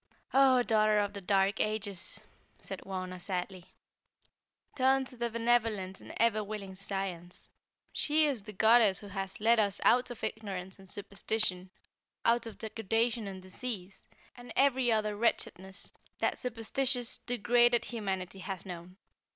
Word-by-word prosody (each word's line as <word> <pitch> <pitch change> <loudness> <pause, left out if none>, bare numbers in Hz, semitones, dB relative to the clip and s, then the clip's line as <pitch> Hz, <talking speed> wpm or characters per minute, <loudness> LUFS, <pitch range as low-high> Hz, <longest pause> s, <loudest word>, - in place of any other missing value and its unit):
"Oh, 265 -2 +6
daughter 215 -2 +3
of 205 -1 +1
the 200 - -6
dark 195 +1 +2
ages," 205 -4 -1 0.3
said - - -7
Wauna, 185 -1 -4
sadly, 180 -1 -4 1.0
"turn 265 0 +3
to 255 - -7
the 235 0 -2
benevolent 225 -5 +1
and - - -10
ever 220 -1 +3
willing 200 -2 -6
Science. 190 -2 -5 0.4
She 310 +1 +3
is 275 -7 0
the 215 - -9
goddess 220 -1 +5
who 205 - -10
has 195 -1 -5
led 225 +2 +4
us 200 -2 +3
out 250 +1 +4
of 245 - -9
ignorance 190 -3 -5
and 190 -1 -5
superstition; 200 -2 -1 0.6
out 235 0 +3
of 225 - -9
degradation 225 +1 -1
and 190 -1 -7
disease, 195 -1 -4 0.3
and 245 0 -11
every 260 -3 +3
other 215 -1 +1
wretchedness 195 -3 -2 0.2
that - - 0
superstitious, 245 +1 0
degraded 240 0 +3
humanity 195 -5 -4
has 190 -1 -5
known. 180 0 -8
215 Hz, 140 wpm, -31 LUFS, 190-235 Hz, 1.0 s, Oh